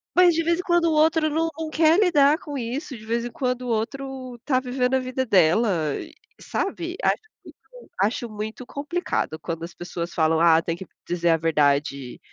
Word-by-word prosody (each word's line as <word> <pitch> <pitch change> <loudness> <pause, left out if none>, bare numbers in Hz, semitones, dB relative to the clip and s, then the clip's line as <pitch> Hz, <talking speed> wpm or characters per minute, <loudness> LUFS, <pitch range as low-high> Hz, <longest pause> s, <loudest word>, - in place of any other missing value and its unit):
Mas, 355 -1 +6
de 330 +1 0
vez 340 +1 +1
em - - -2
quando, 345 -1 +2
o 320 - +2
outro 310 0 +3
não 325 +2 0 0.2
quer 320 +4 +4
lidar 300 -6 +4
com 290 -2 -6
isso. 255 +3 -4
De 215 - -13
vez 235 +1 -1
em 240 - -5
quando, 250 -1 -2
o - - -5
outro 255 +2 -4
tá 255 -3 +2
vivendo 255 0 0
a - - +3
vida 255 0 -2
dela 175 - +3
e - - -9 0.3
sabe? 350 -2 -3
Acho - - +2 0.2
muito, - - -16
acho 230 +3 0
muito 215 +3 -6
complicado 285 - -3
quando 165 -1 -5
as 170 - -7
pessoas 175 0 -6
falam: 160 -1 +2
"Ah, 165 -1 +5
tem 165 0 -3
que 190 - -9 0.2
dizer 175 -1 0
a 165 - +4
verdade, 145 -4 0
250 Hz, 195 wpm, -24 LUFS, -, 0.3 s, Mas